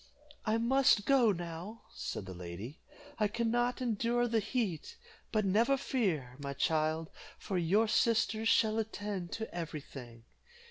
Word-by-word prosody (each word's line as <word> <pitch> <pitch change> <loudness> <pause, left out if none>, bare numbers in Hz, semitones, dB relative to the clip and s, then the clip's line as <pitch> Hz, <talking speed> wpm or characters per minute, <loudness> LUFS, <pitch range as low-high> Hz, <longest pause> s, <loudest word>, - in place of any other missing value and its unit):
"I 215 +1 +3
must 235 -2 +4
go 255 -5 +5
now," 175 +4 -6
said 100 - -5
the 95 - -7
lady; 90 - -8 0.4
"I 210 - +3
can 230 +2 -1
not 245 +2 0
endure 240 +1 +1
the 230 -1 +2
heat; 215 - -2 0.3
but 215 -2 +1
never 230 +8 +3
fear, 170 - -1
my 140 -1 -4
child, 155 +2 0 0.3
for 190 -3 -2
your 200 +7 +3
sisters 225 0 +2
shall 220 0 +3
attend 205 -5 -4
to 220 0 -5
every 165 -3 -4
thing. 120 -4 -11
210 Hz, 145 wpm, -33 LUFS, 160-230 Hz, 0.4 s, go